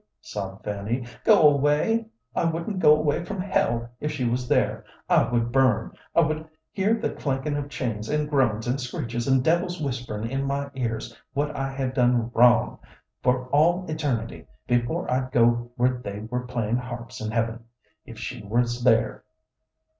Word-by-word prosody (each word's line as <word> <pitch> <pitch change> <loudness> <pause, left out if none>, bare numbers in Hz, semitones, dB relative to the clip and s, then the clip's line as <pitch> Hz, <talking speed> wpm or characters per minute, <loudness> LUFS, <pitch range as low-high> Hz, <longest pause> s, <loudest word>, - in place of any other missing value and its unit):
sobbed 100 -1 -6
Fanny 105 +4 -2 0.2
"go - - +6
away? 150 +11 +2 0.3
I - - +1
wouldn't 165 +4 -2
go 150 -3 +7
away 150 +2 0
from 195 +2 -5
hell 120 -11 0
if 150 - -2
she 145 -4 -3
was 125 +1 -1
there. - - +1 0.2
I - - +4
would 120 -1 +1
burn; 125 -4 +2 0.2
I - - +6
would 155 0 -1 0.2
hear 205 +4 +2
the 225 - -2
clankin' 140 +1 -2
of 145 -1 -3
chains, 115 -6 -3
and 150 0 0
groans, 120 -7 +1
and 130 +3 -1
screeches, 120 -1 -4
and 130 -1 +3
devils 175 +3 +1
whisperin' 125 -6 -3
in 135 +3 -2
my 140 0 -2
ears 115 -4 -3 0.2
what 145 +2 -1
I 135 0 -2
had 135 -1 -2
done 120 -2 +2
wrong, 120 0 +4 0.4
for 125 0 +1
all 170 +6 +3
eternity, 145 -8 -3 0.2
before 120 0 0
I'd 130 0 0
go 120 0 +3
where 125 0 +1
they 100 -1 -5
were 125 +3 -4
playin' 120 -2 -1
harps 120 -2 -7
in 110 - -3
heaven, 115 +1 -2 0.4
if - - -11
she - - -6
was 120 +3 0
there. 115 -2 +2
125 Hz, 170 wpm, -25 LUFS, 120-145 Hz, 0.4 s, go